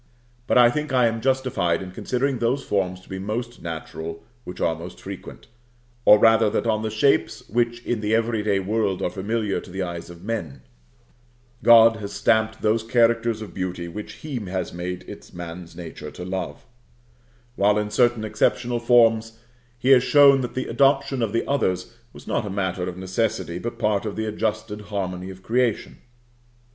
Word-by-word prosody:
But - - +3
I 120 -1 +7
think 150 +1 -3
I 125 -2 +4
am 115 0 0
justified 125 -10 +1
in 95 -1 -7
considering 130 +6 -1
those 125 +4 0
forms 95 -2 -1
to - - -21
be 95 - -6
most 115 +5 -4
natural 80 0 -6 0.2
which 90 - -8
are 80 - +1
most 85 +2 -9
frequent; - - -9 0.6
or, 105 - +9
rather, 115 0 +5
that - - -1
on 110 -2 +1
the 110 - -2
shapes 110 +6 +1
which 120 +2 -1
in 120 -3 -1
the 105 +1 +1
every 115 -1 0
day 105 -2 +1
world 100 -1 -1
are 90 - 0
familiar 105 +1 -2
to - - -12
the 95 +1 -3
eyes 85 -1 -6
of 85 0 -12
men, 100 -10 -4 1.0
God 115 -1 +7
has 100 -1 -7
stamped 110 0 +1
those 110 +1 +2
characters 115 -1 +2
of 110 - -10
beauty 90 -2 -4
which 105 +5 -7
He 150 -4 -6
has 95 -3 -4
made 90 +1 -5
it - - -11
man's 85 0 -8
nature 85 -2 -8
to 90 - -9
love; 90 -5 -5 0.9
while 105 -1 +3
in 105 0 -2
certain 120 0 +2
exceptional 120 +3 0
forms 115 -2 +3 0.4
He 125 +2 -1
has 130 -2 +8
shown 140 -2 +6
that 125 - -5
the 130 - -2
adoption 140 -1 +2
of 110 -3 0
the 115 - -1
others 95 -11 -1 0.2
was - - -14
not - - -1
a 105 - -5
matter 95 -2 -2
of 90 - -8
necessity, 95 -2 -2
but 120 +4 -5
part 105 0 0
of 105 - -4
the 110 - -2
adjusted 105 -1 -3
harmony 95 -3 -4
of 95 0 -11
creation. 120 -1 0
110 Hz, 180 wpm, -23 LUFS, 95-120 Hz, 1.0 s, or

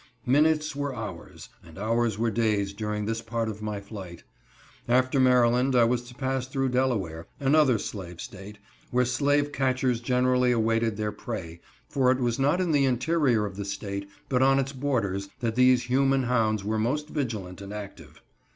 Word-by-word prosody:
Minutes 150 +3 +2
were 145 -2 -3
hours, 110 -3 -8
and 80 -1 -15
hours 115 +1 0
were 115 +1 0
days 105 -3 0
during 105 0 -3
this 115 +1 -2
part 115 0 -2
of 110 -1 -6
my 105 -1 -3
flight. 100 -4 -9 0.6
After 130 +2 +2
Maryland, 125 0 +4
I 120 - +6
was 120 +1 +2
to 125 0 -13
pass 130 -1 -2
through 135 0 -1
Delaware—another 125 - +1
slave 90 -5 -7
State, 100 +2 -9 0.3
where 125 0 +2
slave 145 +3 +1
catchers 130 -3 0
generally 125 0 +2
awaited 115 -2 +1
their 105 -1 -1
prey, 85 -6 -7 0.3
for 130 -2 +2
it 130 - +2
was 120 -1 -1
not 145 +6 +2
in 180 -3 +1
the 145 -2 +3
interior 130 -3 +2
of 100 -1 -7
the 100 - -3
State, 100 -1 -5 0.2
but 125 -1 +1
on 135 +1 +5
its 135 +1 -1
borders, 110 -8 -1
that 115 -2 -1
these 125 0 +4
human 135 +2 +2
hounds 110 -4 +1
were 110 +2 -1
most 150 +7 -1
vigilant 105 - -4
and 100 0 -8
active. 105 -2 -9
120 Hz, 170 wpm, -27 LUFS, 105-130 Hz, 0.6 s, I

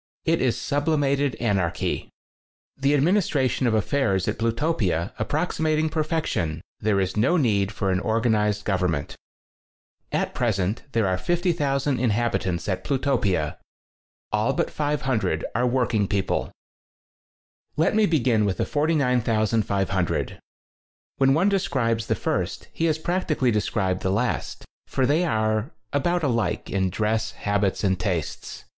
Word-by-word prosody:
It 165 0 +2
is 125 -3 +1
sublimated 145 -2 +1
anarchy. 95 - -1 0.7
The 140 +2 +2
administration 145 -5 +2
of 110 - +2
affairs 105 -4 +1
at - - -2
Plu 115 0 +2
topia 110 - 0
approximating 155 +4 0
perfection, 155 - -1 0.2
there 105 -2 +1
is 95 -1 -1
no 130 +12 +3
need 105 - +2
for 100 -3 -1
an 95 - +1
organized 110 -1 +1
govern 90 -3 +1
ment. 70 -2 -4 1.0
At - - -1
present, 105 -3 0
there 115 -2 +2
are 95 -1 0
50,000 145 - 0
inhab 120 0 +1
itants 85 -3 -2
at 95 -2 -2
Plutopia. 110 - 0 0.7
All 105 +5 +1
but - - -1
500 135 - -1
are 125 +3 +1
working 120 -5 +1
people. 95 -1 -1 1.3
Let 160 - +3
me 215 -1 +4
begin 125 -9 +2
with 100 -3 0
the - - 0
49,500. 115 - 0 0.8
When 135 0 +4
one 175 +5 +3
describes 130 - 0
the - - +1
first - - -2
he 165 - -1
has 160 -2 +2
prac 175 +3 -2
tically 130 -6 +2
described 95 -3 0
the 95 - 0
last, 115 +6 -1 0.2
for 130 - 0
they 150 +6 +2
are 110 -3 0 0.2
about 175 +4 +1
alike 115 -10 -1
in 95 -1 +1
dress, 110 +3 -1
habits 100 -1 -1
and 95 -2 +1
tastes. 90 -5 -3
115 Hz, 135 wpm, -24 LUFS, 100-145 Hz, 1.3 s, me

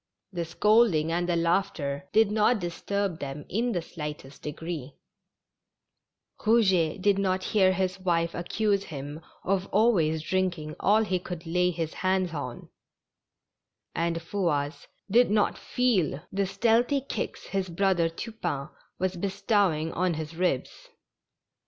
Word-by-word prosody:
The 170 -2 -2
scold 210 +4 +4
ing 155 +1 0
and 175 +1 0
the 175 - +2
laughter 165 -5 0
did 220 -1 +4
not 220 +3 +3
disturb 185 +1 -2
them 140 +1 -6
in 235 +5 0
the 175 -6 -1
slight 150 -4 -6
est 135 +1 -15
degree; 150 -2 -6 1.4
Eouget 190 -7 +3
did 200 -1 +3
not 185 -1 0
hear 190 -3 +5
his 185 0 -1
wife 170 -2 +1
accuse 200 +3 0
him 145 +1 -7 0.2
of 190 0 0
always 175 -8 +3
drinking 175 -4 -1
all 215 +3 +4
he 190 -4 0
could 175 -1 -7
lay 180 +2 +2
his 165 -2 -3
hands 185 -2 0
on, 130 -5 -6 1.2
and 165 0 0
Fouasse 165 -6 -1 0.2
did 245 +3 +5
not 210 0 +2
feel 200 - +1
the 195 0 0
stealthy 230 +7 +2
kicks 275 - -4
his 195 -2 -1
brother 175 -1 +2
Tu 195 +8 -6
pain 145 -10 -3 0.3
was 185 0 -1
bestowing 195 -4 +1
on 180 -1 +1
his 155 +1 -6
ribs. 175 -7 -2
180 Hz, 140 wpm, -27 LUFS, 160-200 Hz, 1.4 s, hear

